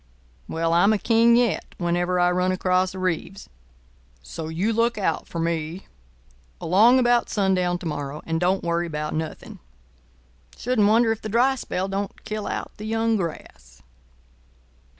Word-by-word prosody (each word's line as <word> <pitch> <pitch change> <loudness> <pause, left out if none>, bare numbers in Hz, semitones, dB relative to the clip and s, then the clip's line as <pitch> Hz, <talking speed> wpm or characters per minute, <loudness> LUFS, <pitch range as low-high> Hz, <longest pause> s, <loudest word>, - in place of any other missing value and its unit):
Well, 165 0 -1
I'm 200 +5 +4
a - - +2
King 230 +2 +4
yet 240 -2 0
whenever 175 +1 0
I 175 0 +3
run 180 +1 +1
across 185 0 0
a - - -6
Reeves. 185 +2 -3 0.8
So 155 - -7
you 180 +8 -1
look 230 0 +1
out 200 - -1
for - - -7
me 165 +1 -3 0.7
along 215 +9 +5
about 240 -1 +2
sundown 185 -3 +1
to 175 - -11
morrow, 150 -1 -5
and 165 0 -1
don't 185 +2 +1
worry 170 0 -1
about 150 -1 -4
nothing. 160 0 -6 1.0
Shouldn't 235 -4 +1
wonder 225 +2 +4
if 225 - -3
the 215 - -5
dry 245 +5 +3
spell 190 -7 -3
don't 195 +1 -5
kill 215 -1 -4
out - - -4
the 210 - -8
young 225 0 +1
grass." 65 - -7
185 Hz, 155 wpm, -23 LUFS, 170-220 Hz, 1.0 s, along